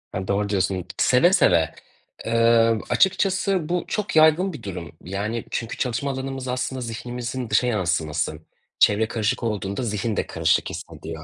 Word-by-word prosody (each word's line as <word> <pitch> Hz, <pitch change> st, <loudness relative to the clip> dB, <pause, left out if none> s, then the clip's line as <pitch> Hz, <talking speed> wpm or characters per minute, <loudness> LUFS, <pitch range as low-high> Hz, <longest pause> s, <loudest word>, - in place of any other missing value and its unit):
Ya 95 Hz, 0 st, -3 dB
doğru 100 Hz, +1 st, 0 dB
diyorsun. 95 Hz, -2 st, 0 dB
Seve 150 Hz, +9 st, +4 dB
seve. 85 Hz, -, +4 dB, 0.6 s
Imm, 115 Hz, 0 st, +4 dB
açıkçası 190 Hz, -2 st, +2 dB
bu, 175 Hz, 0 st, 0 dB
çok 210 Hz, -5 st, -3 dB
yaygın 160 Hz, +4 st, +5 dB
bir 135 Hz, -7 st, -9 dB
durum. 85 Hz, -6 st, -6 dB
Yani, 105 Hz, +5 st, -3 dB
çünkü 115 Hz, -1 st, -3 dB
çalışma 130 Hz, +2 st, -1 dB
alanımız 135 Hz, 0 st, -5 dB
aslında 130 Hz, +1 st, -2 dB
zihnimizin 120 Hz, +1 st, -5 dB
dışa 110 Hz, +4 st, +3 dB
yansıması. 85 Hz, -8 st, -1 dB, 0.4 s
Çevre 105 Hz, +2 st, +4 dB
karışık 115 Hz, +2 st, -1 dB
olduğunda 105 Hz, 0 st, -2 dB
zihin 105 Hz, -1 st, -2 dB
de -, -, -1 dB
karışık -, -, +1 dB
hissediyor. 80 Hz, -1 st, -8 dB
115 Hz, 145 wpm, -23 LUFS, 100-130 Hz, 0.6 s, yaygın